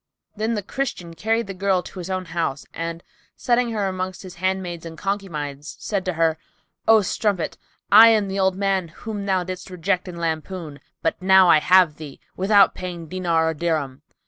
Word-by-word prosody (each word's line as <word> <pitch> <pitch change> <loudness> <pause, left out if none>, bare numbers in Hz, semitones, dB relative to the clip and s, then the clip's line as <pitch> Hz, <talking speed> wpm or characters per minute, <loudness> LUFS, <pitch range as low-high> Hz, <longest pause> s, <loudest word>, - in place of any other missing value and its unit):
Then 220 +2 -1
the 205 - -3
Christian 185 -8 -4
carried 225 +6 0
the 195 - -6
girl 190 -1 +1
to 190 - -10
his 180 +1 -6
own 185 -1 -2
house 165 -4 -3
and 165 0 -5 0.3
setting 240 0 +1
her 210 -3 -1
amongst 185 0 -4
his 185 -2 -9
handmaids 185 -3 -2
and 165 -1 -9
concubines, 150 -8 -4
said 200 -3 -2
to 185 - -1
her, 160 -1 +1 0.5
"O 220 -2 +6
strumpet, 195 -2 -1 0.4
I 220 +3 +10
am 215 -3 +3
the 195 +1 -3
old 190 -1 +2
man 195 -2 0
whom 205 +5 -7
thou 190 -2 +1
didst 185 +1 -7
reject 180 +1 -1
and 175 -1 -7
lampoon; 160 -2 -4 0.2
but 165 - -1
now 190 -1 +6
I 155 - +7
have 180 -2 +4
thee, 150 -3 -10 0.2
without 200 +1 +4
paying 175 -3 -7
diner 170 -3 +1
or 160 - +1
dirham." 150 -4 -2
185 Hz, 185 wpm, -22 LUFS, 165-195 Hz, 0.5 s, I